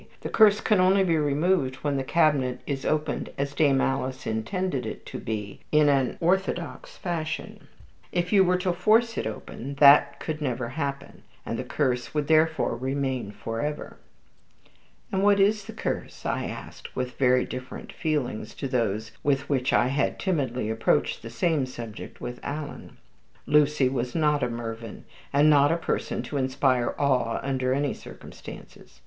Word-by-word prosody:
"The - - -4
curse 210 -2 +5
can 210 -3 +3
only 190 +2 +5
be 170 -3 +2
removed 145 -1 +1
when 145 -1 0
the 135 - -1
cabinet 135 -5 +2
is 135 -2 -3
opened 155 0 -1
as 140 +1 -2
Dame 140 -2 +3
Alice 130 -1 -2
intended 135 - -2
it - - -7
to - - -6
be, 105 -2 -5
in 150 -1 +5
an 135 -3 +1
orthodox 180 0 -1
fashion. 165 -3 -4 0.4
If 175 +2 -1
you 195 -2 +7
were 180 0 +2
to 180 0 0
force 225 +6 +3
it - - -2
open, 125 +5 -7
that 140 0 +6
could 155 -1 -4
never 125 -4 -2
happen, 140 0 -5 0.2
and 115 - -3
the - - -2
curse 125 +1 -1
would 150 -1 +1
therefore 160 -4 +2
remain 130 -2 -2
for 115 +2 -5
ever." 150 0 -4 1.1
"And 190 -2 0
what 205 0 +4
is 205 +1 +3
the - - -7
curse?" - - -4
I - - -1
asked, - - -8
with 125 -1 -4
very 125 -1 +4
different 130 0 -8
feelings 150 -8 -2
to 140 - -4
those 110 -3 -1
with 140 -1 0
which 130 -3 +1
I 120 - +3
had 140 +1 0
timidly 130 - -1
approached 110 0 +1
the 115 - -8
same 135 +3 0
subject 115 -4 -8
with 120 0 -6
Alan. 145 +1 -6 0.5
Lucy 150 -1 +3
was 125 -1 -2
not 150 -3 +2
a 125 - 0
Mervyn, 115 -1 -6 0.3
and 145 +2 +4
not 145 -1 +5
a 165 - +2
person 170 - -2
to 145 - -4
inspire 130 -2 +1
awe 130 -5 +1
under 130 -2 0
any 140 +1 +1
circumstances. - - -12
140 Hz, 165 wpm, -26 LUFS, 125-160 Hz, 1.1 s, you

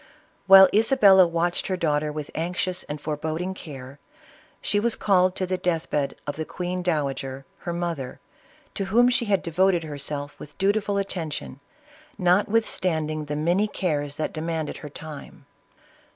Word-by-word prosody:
While 190 0 +10
Isabella 205 -4 +6
watched 170 +1 -1
her 185 - -1
daughter 150 -3 0
with 150 -1 -6
anxious 180 +2 -2
and 150 0 -6
foreboding 160 +5 -3
care, 140 -6 -10 0.6
she 205 - +1
was 230 +1 +2
called 185 -2 +2
to 185 - -1
the 185 0 -2
death 165 -2 -1
bed 145 -2 -1
of 145 0 -4
the 160 - -2
queen 180 +2 -4
dowager, 135 -5 -2
her 175 - -4
mother, 170 -7 -4 0.5
to 195 - -3
whom 240 +6 +4
she 245 -1 +2
had 200 -3 +1
devoted 175 +1 +2
herself 145 -1 -5
with 150 - -12
dutiful 200 +1 +1
attention, 160 - -4 0.6
notwithstanding 180 -5 +1
the 150 0 -4
many 175 +7 +1
cares 145 -8 -2
that 155 - -3
demanded 160 -1 -3
her 145 +1 -9
time. 150 0 -10
170 Hz, 150 wpm, -25 LUFS, 150-190 Hz, 0.6 s, While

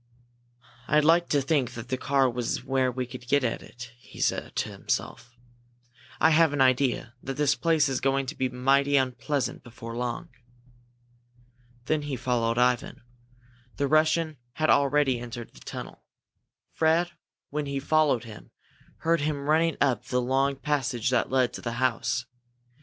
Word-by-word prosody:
"I'd 150 0 +3
like 170 +2 +4
to 145 -2 +2
think 135 -3 0
that 120 +1 -8
that 130 -1 -2
car 135 -1 +3
was 120 -1 -2
where 130 -1 +1
we 125 +1 -3
could 125 0 -10
get 140 +1 +3
at 115 - -1
it," 120 0 -11
he - - -15
said - - -1
to - - -1
himself. 120 0 -4 0.8
"I 160 - +5
have 160 -1 +4
an 145 - -2
idea 130 -2 +2
that 135 0 -5
this 145 -1 +3
place 160 -1 +2
is 135 -2 -2
going 135 +1 +1
to 130 - -6
be 130 -1 -1
mighty 135 +3 +2
unpleasant 130 +1 -1
before 115 -1 -9
long." 125 +7 -3 1.6
Then 155 +2 +1
he 145 -2 -4
followed 120 -2 0
Ivan. 125 -1 +1 0.7
The 140 - +1
Russian 155 +1 +2 0.2
had 155 0 +2
already 140 -2 +3
entered 120 -1 -8
the - - -15
tunnel. - - -8 0.7
Fred, 165 +2 +2 0.4
when 150 0 -2
he 140 0 -2
followed 145 -4 +2
him, 110 -3 -11 0.5
heard 165 0 +2
him 145 -1 -2
running 160 +2 +2
up 130 -6 +1
the 125 - 0
long 135 +2 +1
passage 130 -4 -1
that 125 - +1
led 130 -2 +2
up - - -28
to - - -7
the 115 - -3
house. 120 0 0
135 Hz, 165 wpm, -27 LUFS, 125-150 Hz, 1.6 s, I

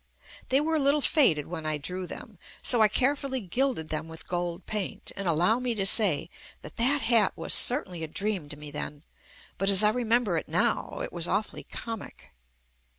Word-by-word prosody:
They 265 - +4
were 315 +2 0
a - - +2
little 285 +1 +3
faded 205 - +4
when 160 -2 -6
I 155 -1 -1
drew 180 +5 -5
them, - - -10 0.2
so 240 -3 +4
I 215 - +7
carefully 265 +3 0
gilded 240 - -2
them 155 +1 -3
with 160 -1 -11
gold 175 0 -3
paint, 210 -3 -4
and 200 -2 -4
al 165 - +2
low 180 +9 +3
me 250 -2 -1
to 195 -2 -1
say 195 -6 +2 0.3
that - - -11
that 275 +5 +2
hat 225 -4 +3
was - - +1
certainly 190 - +3
a - - -3
dream 190 -2 -3
to 145 - -7
me 150 0 -9
then, 145 0 -6 0.6
but 195 +1 +2
as 195 +1 +5
I 210 - +6
remember 235 -5 +2
it - - -4
now 170 +3 0
it - - -6
was 170 -1 -2
awfully 205 +3 -2
comic. 225 -3 -8
195 Hz, 200 wpm, -27 LUFS, 165-245 Hz, 0.6 s, I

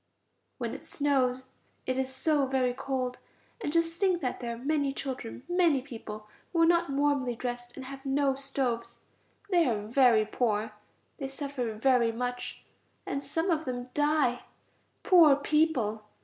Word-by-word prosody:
When - - -3
it - - -8
snows 260 -3 +1 0.4
it 255 - 0
is 265 0 -1
so 280 +1 +1
very 260 -2 +1
cold, 255 -1 -3 0.4
and 290 - -1
just 335 +1 0
think 375 -3 +2
that 255 -3 -2
there 235 -1 -4
are - - -11
many 280 +2 0
children, 260 -3 -5
many 350 -5 +3
people, 215 -5 -8 0.2
who 335 -2 +3
are - - +7
not 340 0 +3
warmly 275 -3 +1
dressed 245 0 -5
and 265 - -8
have 270 0 -9
no 275 0 +2
stoves; 265 -3 -2 0.5
they 345 -3 +4
are 210 -4 -1
very 235 -2 +4
poor. 215 -2 0 0.5
They 275 - -3
suffer 270 -4 -4
very 240 0 +3
much, 245 +1 -4 0.4
and 275 - -3
some 325 +6 -1
of 320 -1 0
them 250 -1 -4
die; 295 -4 +1 0.6
poor 330 -6 +7
people! 285 -7 +1
270 Hz, 155 wpm, -29 LUFS, 245-290 Hz, 0.6 s, are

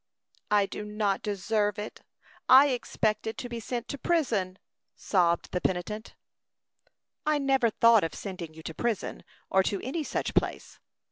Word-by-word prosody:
"I 205 -1 +4
do 210 - -6
not 210 -2 -1
deserve 205 +1 0
it. 210 +1 -7 0.5
I 270 +3 +9
expected 220 -3 -1
to 245 - -5
be 235 -1 -5
sent 240 +1 -4
to 280 - -5
prison," 220 - 0 0.4
sobbed 170 -3 +1
the 180 - -1
penitent. 190 +4 -3 1.1
"I 305 0 +2
never 270 -4 +2
thought 230 0 +5
of 165 - -3
sending 175 -5 -7
you 160 - -11
to 160 - -6
prison, 230 +3 -2 0.3
or 190 - +5
to 195 +1 -1
any 295 +6 -2
such - - -2
place. - - -1
210 Hz, 150 wpm, -28 LUFS, 190-240 Hz, 1.1 s, I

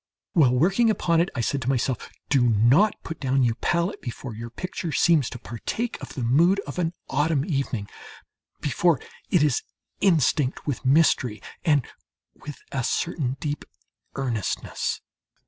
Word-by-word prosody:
While 135 -7 +4
working 195 - +3
upon 170 -5 +2
it, 175 - 0
I 125 - 0
said 135 +4 -1
to 130 - -2
myself: 130 -2 -1 0.2
"Do 135 -3 +4
not 120 - +4
put 160 - -6
down 135 -1 +2
your 120 -2 +3
palette 170 +3 0
before 120 0 -6
your 115 +2 -7
picture 170 +6 -5
seems 150 -1 +3
to - - -7
partake 125 - -4
of - - -9
the 130 - -3
mood 165 +11 +4
of 145 -1 -6
an 170 -1 0
autumn 145 +1 +1
evening, 135 - -2 0.7
before 150 0 +2 0.3
it 175 -5 +4
is 145 -4 +2 0.4
instinct 155 -7 +2
with 145 -4 -3
mystery 130 -6 +3 0.2
and 145 -5 +3 0.5
with 150 -2 -9
a 135 -2 -1
certain 140 -1 -1
deep 150 -1 -3 0.5
earnestness." 120 -7 -2
140 Hz, 150 wpm, -25 LUFS, 125-165 Hz, 0.7 s, While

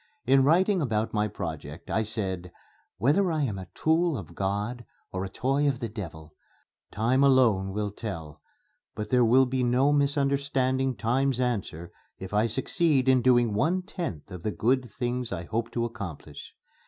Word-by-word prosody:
In 135 0 +5
writing 185 +6 +3
about 110 -5 -1
my 105 -1 +1
project 80 -5 -7
I 110 - +2
said, 95 -5 -4 0.5
"Whether 175 - +2
I 155 -2 0
am 105 -8 -2
a 95 - -8
tool 160 -1 +2
of 90 -8 -9
God 105 +5 -2 0.3
or 95 0 -3
a 95 - -4
toy 135 +8 0
of 135 -3 +1
the 115 - -3
devil, 80 -7 -8 0.6
time 125 +6 +2
alone 115 -8 +4
will 105 +1 -2
tell; 80 -8 -7 0.5
but 105 0 -5
there 125 -1 +5
will 125 +3 +5
be 130 0 -1
no 130 +4 +3
misunderstanding 140 -2 +1
Time's 130 +3 +1
answer 100 -9 -2 0.3
if 95 +1 -8
I 105 +2 +3
succeed 135 - +1
in 130 -1 +5
doing 120 -3 +3
one 165 - +1
tenth 165 - -6
of 90 -2 -7
the 105 - -2
good 125 +4 0
things 120 +1 -3
I 90 -3 -4
hope 115 +6 -2
to 120 -1 0
accomplish.... 100 -9 -8
120 Hz, 165 wpm, -27 LUFS, 100-135 Hz, 0.6 s, In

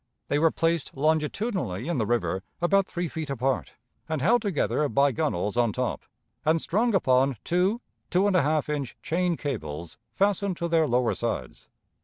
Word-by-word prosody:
They 145 - +2
were 165 +1 +5
placed 165 -3 -1
longitudinally 155 - 0
in 170 -6 -1
the 110 - 0
river, 115 -5 0 0.2
about 195 +3 +3
three 175 0 -3
feet 160 -1 -5
apart, 135 -1 -1 0.4
and 160 -2 -1
held 225 - +3
together 150 -7 0
by 140 +1 +3
gunwales 115 - -1
on 120 -2 +3
top, 125 +2 -2 0.4
and 160 +2 +3
strung 215 +7 +1
upon 130 -6 +3
two 185 +7 +1 0.3
two 185 +3 +3
and 200 -2 +2
a 180 - +5
half 150 +1 +1
inch 145 -4 -3
chain 175 -1 0
cables 85 - -5 0.2
fastened 200 0 +1
to 170 - -2
their 165 -2 +3
lower 125 0 +2
sides. - - -4
155 Hz, 170 wpm, -26 LUFS, 130-180 Hz, 0.4 s, were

